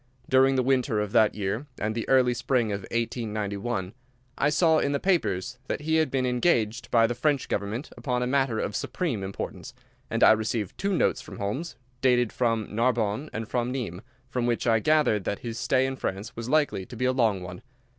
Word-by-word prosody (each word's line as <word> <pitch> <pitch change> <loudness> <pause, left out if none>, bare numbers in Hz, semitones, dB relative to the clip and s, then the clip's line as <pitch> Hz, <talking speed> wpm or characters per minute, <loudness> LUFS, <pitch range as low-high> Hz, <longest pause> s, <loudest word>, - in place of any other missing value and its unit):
During 135 +1 +4
the 130 - +2
winter 125 -4 +1
of 105 -1 -2
that 110 0 +4
year 105 +7 -3
and 110 +1 -2
the 115 0 -4
early 130 -2 +4
spring 120 -3 0
of 100 0 -3
1891, 105 -3 -2 0.4
I 145 - +2
saw 160 +1 +4
in 140 - 0
the 140 - 0
papers 130 - 0
that - - -2
he 160 +1 +1
had 160 -2 +2
been 130 -1 0
engaged 120 -3 +1
by 115 -1 +5
the 115 - 0
French 140 +2 0
government 105 +7 -3
upon 125 -3 -1
a - - 0
matter 130 -3 +1
of 105 - -2
supreme 140 - -2
importance, 95 0 -6 0.3
and - - +1
I - - +9
received 110 -2 -1
two 195 -2 -1
notes - - +1
from - - -10
Holmes, 120 +12 -3 0.3
dated 125 -3 +3
from 115 -3 0
Narbonne 115 +3 0
and 110 0 -4
from 120 0 -1
Nimes, 110 -9 -4 0.3
from 125 -2 -1
which 120 -1 0
I 115 -2 +4
gathered 145 -6 +2
that 100 - -2
his 115 0 -4
stay 130 +1 +2
in 135 0 -2
France 100 +1 -4
was 115 +1 -5
likely 150 -9 +2
to 120 - -9
be 125 +2 -1
a 130 - +3
long 110 -7 +1
one. 90 +3 -8
120 Hz, 205 wpm, -26 LUFS, 110-135 Hz, 0.4 s, I